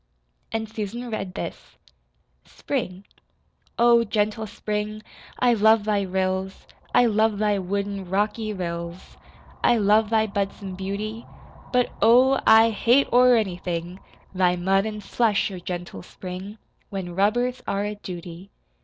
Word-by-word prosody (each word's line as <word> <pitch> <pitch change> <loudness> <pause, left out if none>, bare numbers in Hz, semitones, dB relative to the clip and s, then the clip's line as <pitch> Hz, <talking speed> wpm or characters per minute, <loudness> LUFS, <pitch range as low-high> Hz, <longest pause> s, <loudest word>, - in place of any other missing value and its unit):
And 220 0 -2
Susan 225 +3 -5
read 195 -4 -4
this: - - -7 0.7
SPRING 200 -8 -4 0.7
Oh, 235 0 +5
gentle 215 0 -1
Spring, 210 +1 -4 0.3
I 245 -1 +3
love 220 0 +4
thy 210 -1 +1
rills, 190 0 -2 0.3
I 245 - +5
love 220 -1 +2
thy 210 -1 +1
wooden, 200 0 -3
rocky 210 +3 -1
rills, 170 -2 -6 0.5
I 240 - +4
love 210 +1 +3
thy 220 -1 +3
budsome 200 -1 -4
beauty. 205 +4 -5 0.4
But, 250 -1 +2
oh, 255 +4 +5
I 225 +1 +7
hate 240 +6 +2
o'er 250 0 +6
anything, 180 -4 -3 0.3
Thy 180 -1 +2
mud 195 +3 +1
an' 210 -1 -5
slush, 210 -1 +1
oh, 185 - -6
gentle 175 - -6
Spring, 185 - -8 0.3
When 190 -3 -5
rubbers 240 +7 +1
are 200 +1 -1
a 210 0 -3
duty. 180 -2 -9
205 Hz, 130 wpm, -24 LUFS, 190-220 Hz, 0.7 s, I